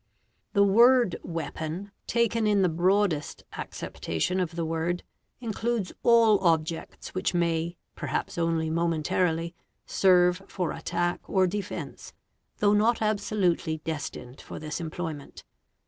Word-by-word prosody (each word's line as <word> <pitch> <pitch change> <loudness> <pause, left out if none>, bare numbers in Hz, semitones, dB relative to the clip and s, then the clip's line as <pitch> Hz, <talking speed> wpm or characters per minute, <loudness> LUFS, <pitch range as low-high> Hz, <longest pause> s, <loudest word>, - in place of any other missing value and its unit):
The 200 -2 +5
word 235 +1 +5
" - - -31 0.2
weapon"', 160 +6 -5 0.2
taken 230 -1 +1
in 205 -2 +3
the 180 - +3
broadest 175 -1 +1
acceptation 85 - -3
of 175 -2 -2
the 170 -1 -1
word, 165 +2 -1 0.4
includes 230 -3 -2
all 230 -3 +5
objects 165 -2 -1
which 185 0 -1
may, 170 0 0 0.2
perhaps 145 -3 -3
only 165 -1 0
momentarily, 165 +1 0 0.3
serve 180 -1 +4
for 180 -3 -2
attack 175 +2 -2
or 190 -1 +3
defence, 200 +2 -5 0.4
though 205 0 +3
not 220 +3 +3
absolutely 195 -6 0
destined 145 -5 -5
for - - -9
this 155 +2 -5
employment. 160 -3 -6
175 Hz, 120 wpm, -27 LUFS, 165-205 Hz, 0.4 s, The